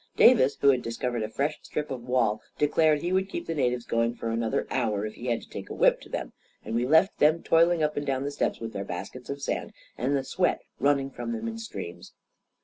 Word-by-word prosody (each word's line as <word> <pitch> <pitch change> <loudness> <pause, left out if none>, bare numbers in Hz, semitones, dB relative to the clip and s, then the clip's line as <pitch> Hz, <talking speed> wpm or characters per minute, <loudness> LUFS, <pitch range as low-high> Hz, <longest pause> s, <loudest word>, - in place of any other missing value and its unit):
Davis, 145 - +6
who 140 - +6
had 130 -2 +4
discovered 120 +1 -2
a 110 - -2
fresh 145 +7 -1
strip 150 -1 -4
of 130 -2 -4
wall, 120 -4 +2 0.2
declared 150 0 +3
he 175 +1 0
would 190 +1 +1
keep 170 - -4
the 165 - -2
natives 125 -5 0
going 115 +1 0
for 115 - -3
another 115 0 0
hour 105 -2 0
if 110 - -5
he 125 - -8
had 120 -1 0
to - - -15
take - - -7
a - - -5
whip - - +4
to - - -13
them; - - -4 0.3
and - - -4
we 120 +2 +1
left 160 +7 +4
them 155 +3 +4
toiling 165 0 +4
up 150 0 0
and 145 - -3
down 135 -1 0
the 145 - -2
steps - - -1
with 115 0 -6
their 100 - -3
baskets 100 +7 -7
of 140 0 -5
sand, - - -3 0.3
and 135 +4 +1
the 135 - -2
sweat 175 +7 0 0.2
running 140 -1 +2
from 235 - -4
them 230 0 -4
in 225 0 -5
streams. 85 - -8
135 Hz, 240 wpm, -27 LUFS, 115-155 Hz, 0.3 s, Davis